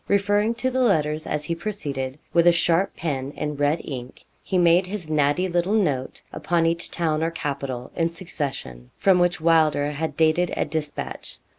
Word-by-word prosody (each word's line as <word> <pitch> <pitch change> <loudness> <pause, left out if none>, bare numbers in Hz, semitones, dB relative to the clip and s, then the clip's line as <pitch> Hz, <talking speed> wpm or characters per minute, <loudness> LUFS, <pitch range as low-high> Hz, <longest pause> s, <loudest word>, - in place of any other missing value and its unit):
Referring 205 +3 +2
to 260 +2 -1
the 260 0 0
letters 155 -9 +1
as 150 0 -2
he 170 - -1
proceeded, 145 -8 -4 0.2
with 170 0 +4
a - - +9
sharp 170 +3 +2
pen 140 -5 -3
in 150 -1 -3
red 145 +3 +1
ink, 130 -3 -7 0.2
he 190 - -1
made 175 +1 +4
his 180 -5 -6
natty 150 +4 +2
little 175 +3 0
note 145 -11 -1
upon 170 -1 0
each 170 +1 0
town 160 -3 0
or 165 - +1
capital 140 -6 -4
in 165 -1 +1
succession, 140 - -5
from 190 -2 +4
which 175 -1 +2
Wylder 155 -3 +3
had 160 +2 -4
dated 160 +2 +3
a - - +1
despatch. 150 -2 -5
165 Hz, 175 wpm, -24 LUFS, 145-180 Hz, 0.2 s, a